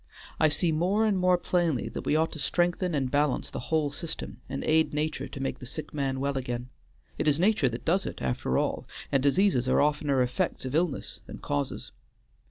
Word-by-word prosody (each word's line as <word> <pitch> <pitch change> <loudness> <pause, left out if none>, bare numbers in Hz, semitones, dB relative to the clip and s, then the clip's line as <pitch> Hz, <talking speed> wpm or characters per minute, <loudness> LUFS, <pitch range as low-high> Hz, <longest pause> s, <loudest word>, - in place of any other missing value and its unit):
I 155 - +6
see 165 +3 +1
more 185 +8 +2
and 210 -2 +2
more 180 -1 +4
plainly 170 -7 0
that - - -6
we - - +3
ought 160 +1 +2
to 155 - -7
strengthen 175 +3 +1
and 135 -3 0
balance 145 -1 +1
the - - -4
whole 155 -3 +2
system, 160 +3 -6
and 135 +1 -3
aid 160 -1 +2
nature 155 +1 -1
to - - -8
make 135 - -3
the 125 - -8
sick 150 +4 -6
man 135 -2 -1
well 140 0 0
again. 125 -1 -4 0.5
It - - 0
is 150 0 +4
nature 190 -7 +3
that 115 0 -6
does 190 +4 +2
it - - -6
after 65 0 -1
all, - - -1 0.2
and 135 - +3
diseases 140 -3 +3
are - - +4
oftener 145 -3 +2
effects 125 +1 -1
of 130 - -4
illness 165 -2 -1
than - - -8
causes. 70 0 -3
150 Hz, 205 wpm, -28 LUFS, 135-170 Hz, 0.5 s, I